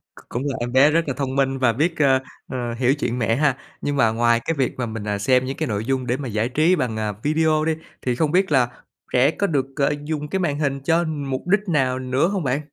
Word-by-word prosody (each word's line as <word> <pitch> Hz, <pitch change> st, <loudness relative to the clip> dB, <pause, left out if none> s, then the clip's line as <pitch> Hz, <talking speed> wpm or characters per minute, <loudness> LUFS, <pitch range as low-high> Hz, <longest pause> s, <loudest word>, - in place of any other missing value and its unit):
C -, -, -14 dB
cũng 120 Hz, -, -3 dB
là 140 Hz, -2 st, -1 dB
em 120 Hz, +1 st, -3 dB
bé 135 Hz, +4 st, +5 dB
rất 165 Hz, +1 st, +1 dB
là 140 Hz, -, -1 dB
thông 135 Hz, -2 st, -2 dB
minh 135 Hz, -1 st, +1 dB
và 125 Hz, -3 st, +3 dB
biết, 160 Hz, +7 st, 0 dB
ơ, 135 Hz, -3 st, +4 dB, 0.3 s
ờ, 120 Hz, -2 st, -3 dB
hiểu 125 Hz, +2 st, +3 dB
chuyện 125 Hz, -4 st, -2 dB
mẹ 115 Hz, -1 st, +1 dB
ha. 140 Hz, -1 st, +2 dB, 0.2 s
Nhưng 145 Hz, -, -1 dB
mà 115 Hz, -5 st, +3 dB
ngoài 115 Hz, +1 st, +2 dB
cái 165 Hz, -, 0 dB
việc 130 Hz, -3 st, 0 dB
mà 125 Hz, -, -1 dB
mình, 110 Hz, -2 st, -5 dB
à, 105 Hz, 0 st, 0 dB
xem 125 Hz, +5 st, +2 dB
những 135 Hz, +1 st, -4 dB
cái 160 Hz, -, -1 dB
nội 105 Hz, -2 st, -2 dB
dung 130 Hz, 0 st, -1 dB
để 125 Hz, +1 st, 0 dB
mà 140 Hz, -2 st, -5 dB
giải 110 Hz, +1 st, -1 dB
trí 155 Hz, +7 st, +3 dB
bằng, 125 Hz, -9 st, -2 dB
à, 105 Hz, -1 st, -1 dB
video 155 Hz, 0 st, +2 dB
đi, 160 Hz, -, +1 dB, 0.3 s
thì 125 Hz, -2 st, -1 dB
không 155 Hz, +2 st, 0 dB
biết 190 Hz, -1 st, +2 dB
là 130 Hz, -4 st, +3 dB, 0.4 s
trẻ 130 Hz, +4 st, +4 dB
có 200 Hz, -, -1 dB
được, 140 Hz, -6 st, 0 dB
à, 140 Hz, -, +3 dB
dùng 150 Hz, -1 st, -3 dB
cái 190 Hz, -, -2 dB
màn 150 Hz, -5 st, -1 dB
hình 140 Hz, -2 st, 0 dB
cho 165 Hz, +5 st, +2 dB
mục 145 Hz, -3 st, -4 dB
đích 205 Hz, +3 st, +2 dB
nào 130 Hz, -5 st, +1 dB
nữa 130 Hz, +4 st, +1 dB
hông 195 Hz, -2 st, -2 dB
bạn? 135 Hz, +2 st, 0 dB
135 Hz, 270 wpm, -22 LUFS, 125-155 Hz, 0.4 s, bé